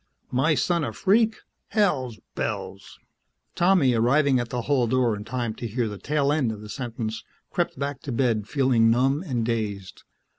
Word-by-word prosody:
"My 140 +5 +2
son 170 0 +1
a - - -3
freak! 220 +3 +3 0.3
Hell's 140 - 0
bells!" - - -5 0.6
Tommy, 175 -8 +4
arriving 130 +4 +3
at 120 -1 -3
the 125 -1 -3
hall 130 -3 +2
door 120 -2 +2
in 105 - -7
time 120 -2 -2
to 120 - -6
hear 115 +1 -1
the 105 -2 -6
tail 145 -1 +1
end 135 -7 +1
of 105 -1 -7
the 105 - -10
sentence, 115 -3 -4 0.3
crept - - -1
back 140 -1 -3
to 140 - -5
bed 115 -4 0
feeling 130 -5 +3
numb 135 +5 +2
and 125 -10 -2
dazed. 105 -5 -3
125 Hz, 175 wpm, -25 LUFS, 115-145 Hz, 0.6 s, Tommy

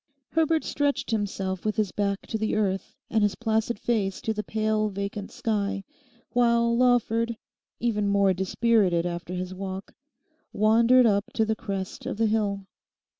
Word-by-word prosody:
Herbert 320 0 +2
stretched 285 -4 -1
himself 195 -4 -2
with 215 -1 -1
his 210 -4 0
back 200 -1 -1
to 220 - -3
the 220 - 0
earth, 195 -3 -1 0.2
and 220 - +2
his 205 -1 +2
placid 225 0 0
face 200 -4 -1
to 220 - -1
the 210 - -2
pale 215 0 0
vacant 200 +1 -4
sky, 200 -3 -1 0.5
while 235 -1 +3
Lawford, 235 -2 +2 0.4
even 210 -3 0
more 200 -1 +3
dispirited 190 -2 +2
after 175 0 -4
his 185 +1 -4
walk, 190 +1 -6 0.6
wandered 230 +4 +5
up 200 -2 +3
to 220 - +2
the 220 0 0
crest 195 -4 -5
of - - -3
the 225 - +2
hill. 205 -3 0
215 Hz, 155 wpm, -26 LUFS, 195-230 Hz, 0.6 s, wandered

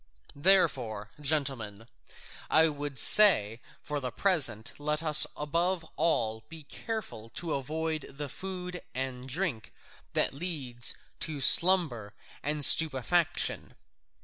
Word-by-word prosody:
Therefore, 130 - 0
gentlemen, 135 -8 -4 0.6
I 160 +1 +4
would 145 -2 -6
say, 120 - +6 0.2
for 150 -1 -5
the 130 -2 -5
present 135 - 0
let 150 +2 -3
us 150 -2 +7
above 170 +4 -3
all 110 -9 -2
be 160 -1 -12
careful 195 - -8
to 165 -2 -5
avoid 155 +3 -5
the 145 +1 -8
food 180 +3 -8
and 130 0 -5
drink 150 - -5 0.4
that - - -1
leads 135 -7 -2 0.2
to 155 -3 -5
slumber 135 - +4 0.3
and 150 -1 +2
stupefaction. 160 +3 +2
150 Hz, 110 wpm, -27 LUFS, 125-170 Hz, 0.6 s, us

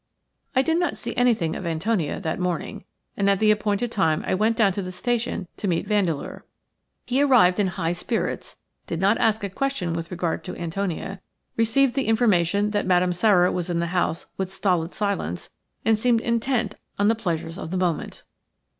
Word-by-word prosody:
I 260 - +4
did 325 +4 +1
not 350 - -1
see 235 - -5
anything 225 -10 +2
of - - -5
Antonia 170 0 -1
that 165 -3 -3
morning, 180 -1 -3 0.3
and 200 0 +2
at 200 - +3
the 215 +2 +4
appointed 210 +2 0
time 160 -8 +1
I - - 0
went 220 +4 +2
down 205 -4 +4
to 200 - -3
the 185 -1 -5
station 225 -1 -2
to 205 - -3
meet 170 0 0
Vandeleur. 190 -8 -1 0.6
He 260 +3 +1
arrived 235 -10 +5
in 200 - +3
high 170 -2 -1
spirits, 175 - -3 0.3
did 165 - -3
not 200 +4 +3
ask 220 -1 +2
a - - 0
question 200 -5 -2
with 165 0 -4
regard 175 -2 -2
to 180 - -6
Antonia, 185 +2 -3 0.3
received 240 +3 +3
the 270 +1 -1
information 205 -3 +2
that 205 -2 -1
Madame 180 -1 +3
Sara 180 -1 +4
was 180 -1 -3
in 175 - 0
the 170 +1 -2
house 175 -2 0
with 190 -1 -3
stolid 185 -3 0
silence, 200 - -2 0.3
and 220 -1 +3
seemed 235 -1 +3
intent 235 -2 0 0.2
on 200 - +2
the 225 - +5
pleasures 170 -5 -3
of - - -6
the 185 - -2
moment. 180 -3 -2
195 Hz, 190 wpm, -24 LUFS, 175-225 Hz, 0.6 s, arrived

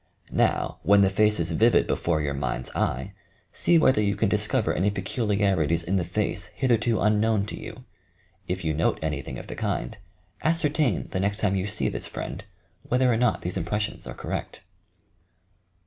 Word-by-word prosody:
Now - - +1
when 100 0 +5
the 95 -1 +4
face 105 +1 +3
is 85 0 -1
vivid 115 +8 +4
before 80 -3 0
your 70 -1 -1
mind's 65 -2 -3
eye, 65 +2 -2 0.4
see 170 - +3
whether 130 -8 +4
you 100 -1 +1
can - - +1
discover - - +1
any 95 +4 +1
peculiarities 95 - 0
in 95 +3 0
the 90 - +1
face 100 +2 -2
hitherto 120 -3 +1
un 105 0 +3
known 110 -2 +2
to 105 - -6
you. 130 - -9 0.6
If 90 -1 -3
you 80 - +1
note 80 +2 +1
anything 75 -5 -3
of - - -8
the - - -7
kind, 60 - -2 0.5
ascertain, 155 - +1
the 95 - -1
next 100 +2 0
time 105 -3 +1
you 95 +1 -1
see 105 +1 -1
this - - -2
friend, - - -6 0.4
whether 125 0 +2
or - - +1
not 125 +1 +1
these 90 +2 -3
impressions 105 +5 -3
are - - -7
correct. - - -5
100 Hz, 180 wpm, -26 LUFS, 85-110 Hz, 0.6 s, when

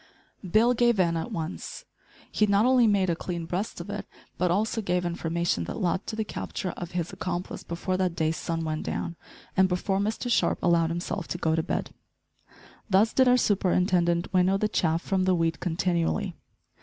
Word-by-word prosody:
Bill 215 +7 +4
gave 240 -3 +3
in 170 -2 +3
at 165 - -3
once! 165 +1 -5 0.5
He 210 - +2
not 200 +2 +4
only 250 -2 +5
made 195 -4 +3
"a - - 0
clean 170 -1 -4
breast 180 +6 -3
of 175 +4 -6
it," 205 -1 -5 0.3
but 180 - +1
also 215 +5 +1
gave 180 -2 0
information 170 - -1
that - - -5
led 185 +2 -1
to 220 - -3
the 220 - -1
capture 190 -3 -4
of 175 -1 -8
his 175 -2 -2
accomplice 180 0 -4
before 185 +2 -3
that 185 -2 0
day's 160 -1 0
sun 165 0 -3
went 155 0 -2
down, 170 - -3 0.4
and 190 0 +4
before 190 +2 0
Mr 215 +4 -2
Sharp - - +2
allowed 170 -2 +3
himself 170 +1 -3
to - - -3
go 160 -2 +1
to 160 - +2
bed. - - -3 1.0
Thus 200 +3 +4
did 260 -1 +4
our 250 0 +6
superintendent 180 -5 +2
winnow 185 +1 +4
the 215 - +1
chaff 165 -4 0
from 190 -1 0
the 185 -1 +3
wheat 165 -1 0
continually. 175 +2 0
180 Hz, 190 wpm, -27 LUFS, 170-200 Hz, 1.0 s, our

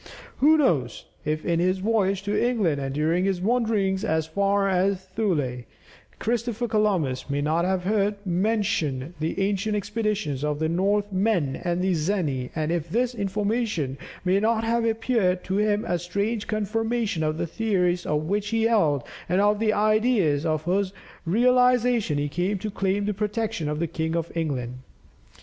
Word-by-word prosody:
Who 310 +3 +5
knows, 155 - +1 0.2
if 155 +1 -2
in 170 -1 +1
his 185 +2 +2
voyage 195 -1 +1
to 205 +1 -1
England 210 - +1
and 135 0 -3
during 160 +4 +1
his 195 -2 0
wanderings 210 -3 +1
as 160 -7 0
far 200 +4 +1
as 190 0 +1
Thule, 175 - -1 0.6
Christopher 240 0 -1
Columbus 185 - 0
may 140 0 0
not 160 +4 +1
have 185 -1 0
heard 205 +1 +1
mentioned 175 - 0
the 160 +4 -2
ancient 200 +2 0
expeditions 210 - -2
of 150 -1 0
the 160 +1 0
Northmen 195 -4 +1
and 175 0 -2
the 190 0 +2
Zeni, 155 -7 -1
and 155 0 -1
if 170 -1 -2
this 245 +6 0
information 205 - -1 0.3
may 185 +2 +3
not 225 +1 +1
have 230 0 +1
appeared 220 -5 +1
to 190 +1 -2
him 210 0 +1
a 175 0 0
strange 200 +5 -2
confirmation 220 -2 -1
of 155 0 0
the - - -1
theories 180 -1 0
which 175 +8 -1
he 225 +1 0
held, 165 - +2 0.3
and 180 +2 +2
of 205 +1 +3
the 220 -1 +2
ideas 215 - +2
for 155 -1 +2
whose 185 +5 -1 0.3
realization 245 -3 +3
he 145 0 0
came 180 +7 -1
to 210 +3 -5
claim 195 +1 0
the 210 - 0
protection 210 -4 -2
of 150 - -2
the 170 - 0
King 160 0 -2
of 170 0 -3
England? 130 -7 -3
195 Hz, 165 wpm, -25 LUFS, 160-215 Hz, 0.6 s, Who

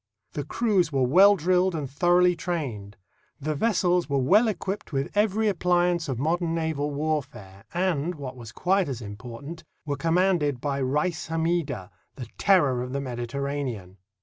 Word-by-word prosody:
The 145 - -3
crews 190 - +1
were 135 -2 +1
well 190 +10 +6
drilled 180 +1 +2
and 150 -3 -3
thoroughly 175 +5 +3
trained. 130 - -4 0.4
The 155 +2 -2
vessels 180 -1 +1
were 140 - +1
well 195 - +4
equipped 200 -3 -4
with 135 -2 -2
every 215 +1 +2
appliance 175 -3 +1
of 130 - -2
modern 165 +4 0
naval 160 -3 -1
warfare 140 -10 -4
and, 175 -2 -1
what 135 -4 -7
was 115 -3 -10
quite 185 +6 +1
as 125 -3 -5
important, 120 +10 -8 0.2
were 145 -1 -2
commanded 165 -3 +1
by 140 +1 -2
Rais 150 +6 -1
Hammida, 165 -1 -1 0.2
the 125 - -7
terror 145 -11 +3
of 125 +1 -5
the 140 - -1
Mediterranean. 125 -5 -4
155 Hz, 150 wpm, -26 LUFS, 135-180 Hz, 0.4 s, well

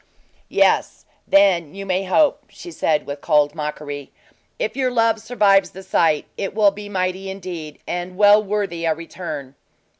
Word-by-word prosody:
"Yes; - - +1 0.2
then 185 -6 +3
you 195 0 -6
may 190 0 -1
hope," 290 +11 +2
she 350 - -11
said, 155 - 0
with 140 0 -6
cold 150 -2 +2
mockery. 150 -2 -6 0.5
"If - - -3
your 260 -1 +1
love 230 -2 +2
survives 205 -4 +3
the 190 - -11
sight, 160 -5 +1
it 195 0 -4
will 210 -2 +5
be 205 +1 -9
mighty, 185 0 -2
indeed, 175 -6 -7
and 180 +1 -5
well 205 +1 +6
worthy 200 -5 -2
a 160 -1 +1
return." 155 -5 -7
185 Hz, 155 wpm, -21 LUFS, 160-205 Hz, 0.5 s, well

